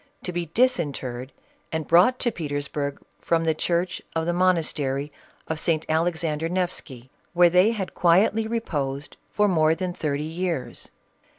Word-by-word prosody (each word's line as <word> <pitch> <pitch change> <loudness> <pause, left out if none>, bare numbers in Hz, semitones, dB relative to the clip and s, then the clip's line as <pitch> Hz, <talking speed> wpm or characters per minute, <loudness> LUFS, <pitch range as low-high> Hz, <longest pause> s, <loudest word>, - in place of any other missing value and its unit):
to 180 - -4
be 175 -1 -2
disinterred 140 - 0 0.4
and 160 -1 -3
brought 180 +10 +5
to 240 - +1
Petersburg 145 -4 -3 0.2
from 165 -1 +1
the 160 -1 +2
church 170 +3 -1
of 165 0 0
the 175 - 0
monastery 155 -6 +1 0.4
of 160 -1 -2
St. 160 -1 0
Alexander 160 -1 0
Nefsky, 160 -9 -3 0.2
where 175 -1 +5
they 180 +4 +5
had 195 -5 -4
quietly 200 +6 +3
reposed 145 -12 -3
for 210 0 +2
more 160 -4 +3
than 180 0 -3
thirty 150 -3 -2
years. 165 -2 -3
165 Hz, 140 wpm, -25 LUFS, 150-180 Hz, 0.4 s, brought